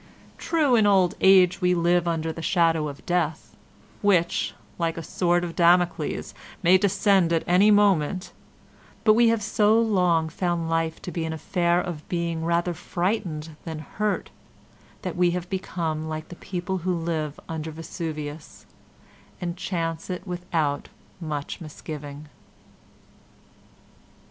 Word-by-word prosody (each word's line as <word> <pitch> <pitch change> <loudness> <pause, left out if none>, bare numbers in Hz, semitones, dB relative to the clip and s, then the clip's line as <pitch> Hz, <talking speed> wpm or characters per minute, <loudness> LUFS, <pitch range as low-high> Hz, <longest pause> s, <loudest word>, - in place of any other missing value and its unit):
True, 310 -6 +2
in 215 -3 +4
old 190 -3 +4
age 190 -1 +5
we 180 0 +3
live 175 0 +2
under 165 -1 -1
the 165 - -7
shadow 165 -3 +2
of 140 -1 -9
Death, 170 -3 -1 0.5
which, 180 -5 +2 0.2
like 165 -1 -1
a 165 - -4
sword 175 +2 +1
of 170 -1 -5
Damocles, 175 0 +2 0.3
may 185 +2 +6
descend 195 -2 +3
at 165 -1 +2
any 185 +4 +5
moment, 195 -4 +3 0.7
but 215 - +6
we 235 +2 +5
have 225 -2 +2
so 215 +1 +3
long 180 -7 +2
found 170 0 -2
life 165 0 -1
to 180 - -5
be 170 - -3
an 160 0 -3
affair 170 +2 +1
of 175 -5 -5
being 170 -2 -2
rather 170 +1 +1
frightened 175 -3 -3
than 160 -2 -5
hurt 205 +7 -3 0.7
that - - -4
we 180 0 +3
have 180 +1 -7
become 160 -4 -3
like 155 0 -5
the 175 - -8
people 185 +1 -4
who 180 +1 -1
live 160 -3 -3
under 160 -1 -4
Vesuvius, 155 -1 -7 0.7
and 175 -1 -3
chance 175 -3 -3
it 180 +2 -4
without 170 -6 -2 0.3
much 150 -3 -5
misgiving. 150 -2 -8
175 Hz, 140 wpm, -25 LUFS, 160-185 Hz, 0.7 s, may